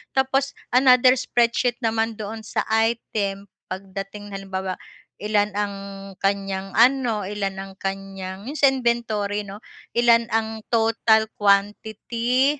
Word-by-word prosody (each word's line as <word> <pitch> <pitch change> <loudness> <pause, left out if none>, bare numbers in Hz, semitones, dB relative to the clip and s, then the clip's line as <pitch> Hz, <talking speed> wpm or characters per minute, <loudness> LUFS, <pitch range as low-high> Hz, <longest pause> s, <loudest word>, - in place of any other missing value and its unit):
Tapos 270 +1 +1 0.2
another 255 0 +6
spreadsheet 240 0 +1
naman 225 0 0
doon 215 +1 -5
sa 210 - -2
item 215 -3 0 0.2
pagdating 195 +2 -7
halimbawa, 190 -1 -4 0.4
ilan 210 0 +1
ang 205 -1 -1 0.5
kanyang 195 -1 -1
ano, 240 -3 +4
ilan 200 -1 -3
ang 195 0 -8
kanyang 195 +1 -5
yung 290 - -5
sa 275 -2 +6
inventory 230 -5 -1
'no, 200 +1 -9 0.4
ilan 235 -1 +5
ang 220 0 -1
total 225 -1 +3
quantity 220 +7 +1
215 Hz, 115 wpm, -23 LUFS, 195-235 Hz, 0.5 s, another